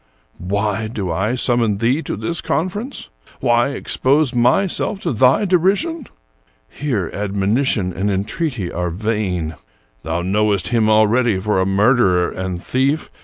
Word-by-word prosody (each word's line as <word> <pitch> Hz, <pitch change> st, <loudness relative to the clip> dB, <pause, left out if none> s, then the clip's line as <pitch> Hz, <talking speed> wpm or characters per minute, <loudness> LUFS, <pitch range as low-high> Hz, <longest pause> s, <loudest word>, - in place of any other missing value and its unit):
"Why 100 Hz, +3 st, -1 dB
do 105 Hz, -6 st, -4 dB
I 105 Hz, +8 st, 0 dB
summon 120 Hz, -4 st, +1 dB
thee 125 Hz, +8 st, +1 dB
to -, -, -4 dB
this 170 Hz, -1 st, -3 dB
conference? 205 Hz, -, -3 dB, 0.3 s
Why 120 Hz, 0 st, +2 dB
ex -, -, -4 dB
pose 140 Hz, +1 st, +2 dB
myself 180 Hz, +11 st, +1 dB
to -, -, -1 dB
thy 130 Hz, -, +3 dB
derision? 200 Hz, -, +1 dB, 0.6 s
Here 105 Hz, -, -3 dB
admonition 100 Hz, 0 st, 0 dB
and 100 Hz, +5 st, -1 dB
en 95 Hz, -1 st, 0 dB
treaty 120 Hz, -, -3 dB
are 90 Hz, 0 st, -2 dB
vain. 90 Hz, -4 st, -2 dB, 0.5 s
Thou 80 Hz, +4 st, -3 dB
knowest 100 Hz, -1 st, +1 dB
him 110 Hz, -2 st, +2 dB
already 110 Hz, 0 st, +3 dB
for 105 Hz, -1 st, 0 dB
a 95 Hz, -, 0 dB
murderer 95 Hz, -3 st, +3 dB
and 95 Hz, -1 st, -4 dB
thief. 135 Hz, -, -1 dB
110 Hz, 140 wpm, -19 LUFS, 95-130 Hz, 0.6 s, thy